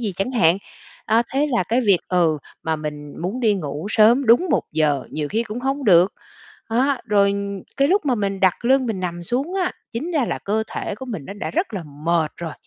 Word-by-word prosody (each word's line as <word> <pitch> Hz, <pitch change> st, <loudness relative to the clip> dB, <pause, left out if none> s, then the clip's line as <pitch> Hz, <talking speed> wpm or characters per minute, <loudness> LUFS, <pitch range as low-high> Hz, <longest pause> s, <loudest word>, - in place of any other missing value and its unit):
gì 215 Hz, -5 st, -2 dB
chẳng 195 Hz, +6 st, -1 dB
hạn. 185 Hz, -7 st, +3 dB, 0.5 s
A, 225 Hz, +2 st, +3 dB
thế 285 Hz, +3 st, +2 dB
là 240 Hz, -6 st, +2 dB
cái 225 Hz, +7 st, +1 dB
việc 200 Hz, -7 st, +4 dB
ừ, 170 Hz, -4 st, +2 dB, 0.2 s
mà 160 Hz, -1 st, -1 dB
mình 150 Hz, -1 st, -6 dB
muốn 200 Hz, +9 st, -3 dB
đi 220 Hz, -4 st, +3 dB
ngủ 150 Hz, -2 st, -4 dB
sớm 235 Hz, +5 st, +5 dB
đúng 240 Hz, +11 st, +5 dB
1 -, -, +2 dB
giờ, 150 Hz, -3 st, +1 dB
nhiều 150 Hz, -1 st, -3 dB
khi 225 Hz, +2 st, 0 dB
cũng 230 Hz, +2 st, -6 dB
không 270 Hz, +1 st, -2 dB
được. 180 Hz, +1 st, +5 dB, 0.6 s
Á, 260 Hz, +3 st, +1 dB
rồi 200 Hz, -3 st, +3 dB, 0.4 s
cái 275 Hz, +1 st, +3 dB
lúc 390 Hz, -1 st, +2 dB
mà 255 Hz, -, +3 dB
mình 200 Hz, -3 st, -2 dB
đặt 190 Hz, +3 st, +2 dB
lưng 260 Hz, +1 st, +3 dB
mình 215 Hz, -5 st, -2 dB
nằm 175 Hz, -1 st, -4 dB
xuống 265 Hz, -, -2 dB
á, 370 Hz, -2 st, 0 dB, 0.2 s
chính 300 Hz, +10 st, -3 dB
ra 300 Hz, -7 st, +1 dB
là -, -, -3 dB
cơ 215 Hz, +2 st, 0 dB
thể -, -, -4 dB
của 260 Hz, +6 st, -9 dB
mình 210 Hz, -, -5 dB
nó -, -, -6 dB
đã 205 Hz, -, -5 dB
rất 350 Hz, 0 st, -1 dB
là 190 Hz, -, -3 dB, 0.2 s
mệt 165 Hz, -2 st, +2 dB
rồi 165 Hz, -3 st, -5 dB
210 Hz, 225 wpm, -21 LUFS, 175-255 Hz, 0.6 s, sớm